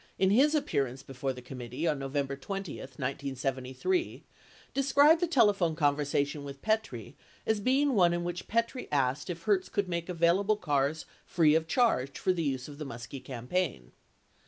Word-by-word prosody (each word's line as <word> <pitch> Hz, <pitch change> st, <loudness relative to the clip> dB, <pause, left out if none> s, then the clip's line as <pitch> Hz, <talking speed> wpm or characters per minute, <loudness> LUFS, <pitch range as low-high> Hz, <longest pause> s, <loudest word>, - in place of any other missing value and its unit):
in 190 Hz, 0 st, +3 dB
his 285 Hz, +8 st, +4 dB
appearance 135 Hz, -, -1 dB
before 135 Hz, 0 st, -3 dB
the 125 Hz, -1 st, -9 dB
committee 125 Hz, +3 st, -5 dB
on 150 Hz, -3 st, 0 dB
November 140 Hz, 0 st, -2 dB
20, 195 Hz, +4 st, -5 dB
1973, 135 Hz, -, -3 dB, 0.5 s
described 285 Hz, +4 st, +5 dB
the 350 Hz, -, +2 dB
telephone 205 Hz, -, +3 dB
conversation 145 Hz, -1 st, 0 dB
with 140 Hz, -1 st, -9 dB
Petrie 220 Hz, 0 st, -2 dB, 0.3 s
as 220 Hz, -1 st, +1 dB
being 270 Hz, +5 st, +2 dB
one 180 Hz, -6 st, +5 dB
in 175 Hz, 0 st, -1 dB
which 175 Hz, 0 st, -4 dB
Petrie 230 Hz, +3 st, -1 dB
asked 135 Hz, +2 st, 0 dB
if 170 Hz, -1 st, -5 dB
Hertz 195 Hz, -2 st, +1 dB
could 200 Hz, -2 st, -1 dB
make 170 Hz, 0 st, -3 dB
available 180 Hz, +5 st, +2 dB
cars 145 Hz, -3 st, 0 dB, 0.2 s
free 160 Hz, -4 st, +4 dB
of 160 Hz, 0 st, +2 dB
charge 160 Hz, -, +1 dB
for 185 Hz, -, +1 dB
the 175 Hz, -, -2 dB
use 135 Hz, -4 st, -2 dB
of 145 Hz, 0 st, -11 dB
the -, -, -3 dB
Muskie 125 Hz, +1 st, -8 dB
campaign. 125 Hz, -, -3 dB
160 Hz, 160 wpm, -30 LUFS, 135-200 Hz, 0.5 s, described